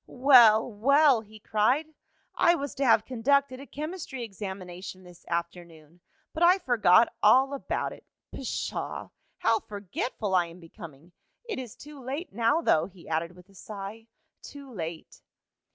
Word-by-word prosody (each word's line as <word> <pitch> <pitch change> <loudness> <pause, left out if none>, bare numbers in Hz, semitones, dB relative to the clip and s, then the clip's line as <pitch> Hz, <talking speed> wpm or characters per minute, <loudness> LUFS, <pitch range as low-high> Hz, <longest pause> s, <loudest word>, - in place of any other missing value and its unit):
"Well, 245 -5 +6
well!" 265 +3 +4
he 215 0 -15
cried. 250 +10 0 0.4
"I 345 - +4
was 285 -3 -5
to 275 - -2
have 225 -4 +4
conducted 260 +2 +1
a 275 - -11
chemistry 305 -4 -6
examination 190 -3 -8
this 180 -1 -17
afternoon, 170 -1 -6 0.3
but 315 - -6
I 355 +2 +6
forgot 235 - +4
all 270 +2 +5
about 275 - -3
it. - - -15 0.3
Pshaw! 270 - -4 0.3
How 225 0 +2
forgetful 205 +1 -5
I 180 -2 +3
am 170 +2 -13
becoming! 165 -2 -13 0.4
It 440 - -4
is 245 -4 -8
too 295 -1 -12
late, 275 - -5
now, 235 +9 +2
though," 160 - +2
he 185 -3 -17
added 165 +2 -2
with 180 0 -17
a - - -20
sigh. 210 +3 -9 0.3
"Too 280 -3 -11
late!" 165 -4 -7
225 Hz, 150 wpm, -27 LUFS, 180-275 Hz, 0.4 s, Well